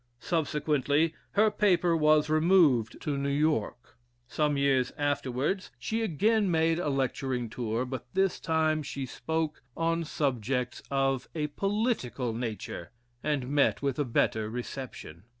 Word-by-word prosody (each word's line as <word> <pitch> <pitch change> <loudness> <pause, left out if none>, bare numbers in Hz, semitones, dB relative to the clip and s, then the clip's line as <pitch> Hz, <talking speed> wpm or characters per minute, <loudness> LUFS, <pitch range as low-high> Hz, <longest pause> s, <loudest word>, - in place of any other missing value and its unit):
Subsequently, 150 0 +1 0.2
her 215 +1 +4
paper 180 -5 +3
was 155 -1 +4
removed 155 - +3
to 145 -2 -2
New 140 0 -1
York. 140 -5 -1 0.3
Some 150 +2 0
years 135 -2 +2
afterwards, 145 +5 -1
she 220 - -2
again 215 +2 +2
made 165 0 +2
a 175 - -1
lecturing 130 -3 -1
tour, 115 +1 -2
but 125 -1 -6
this 190 -1 +2
time 160 -1 +1
she 140 -2 -5
spoke 160 +4 -3 0.2
on 165 0 +1
subjects 125 -4 -1
of 135 -2 0
a 155 -2 0
political 195 - -1
nature, 110 -7 -5 0.3
and 145 -4 -1
met 145 0 +2
with 140 0 -1
a - - +3
better 110 -3 0
reception. 120 - -7
145 Hz, 130 wpm, -29 LUFS, 125-160 Hz, 0.3 s, her